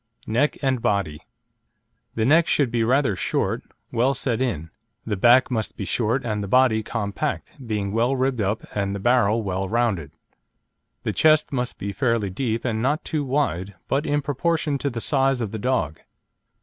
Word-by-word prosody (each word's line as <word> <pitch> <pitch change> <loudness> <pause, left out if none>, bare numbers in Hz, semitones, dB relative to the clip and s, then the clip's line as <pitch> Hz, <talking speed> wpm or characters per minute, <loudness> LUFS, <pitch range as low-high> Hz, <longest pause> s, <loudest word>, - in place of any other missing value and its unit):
NECK 125 +7 +1
AND 130 -3 +1
BODY 100 -9 0 0.9
The 110 - +1
neck 155 +6 +5
should 140 -5 +2
be 120 -1 +1
rather 125 -2 +2
short, - - -1 0.3
well 125 +4 +2
set 125 -2 -1
in. 80 - -2 0.3
The 110 - -1
back 120 +6 +5
must 110 -3 -2
be 100 - -4
short 120 +5 0
and 105 -3 -2
the - - -4
body 125 0 +4
compact, 110 +6 -3
being 105 -4 -2
well 120 +5 +1
ribbed 130 -2 0
up 100 +2 -1
and 100 -1 -1
the - - -4
barrel 115 -1 +3
well 95 -1 -2
rounded. 110 - 0 0.9
The - - -1
chest 155 -1 +4
must 125 -2 -2
be 100 - -4
fairly 115 -4 0
deep 115 +3 -2
and 110 -3 -1
not 145 +6 0
too 155 -3 -1
wide, 100 - -1
but 140 +3 0
in 145 0 +1
proportion 150 +1 0
to 140 - -1
the 120 -3 -5
size 135 -1 +2
of 110 -4 -3
the 110 - -4
dog. 100 - -1
120 Hz, 175 wpm, -23 LUFS, 105-135 Hz, 0.9 s, neck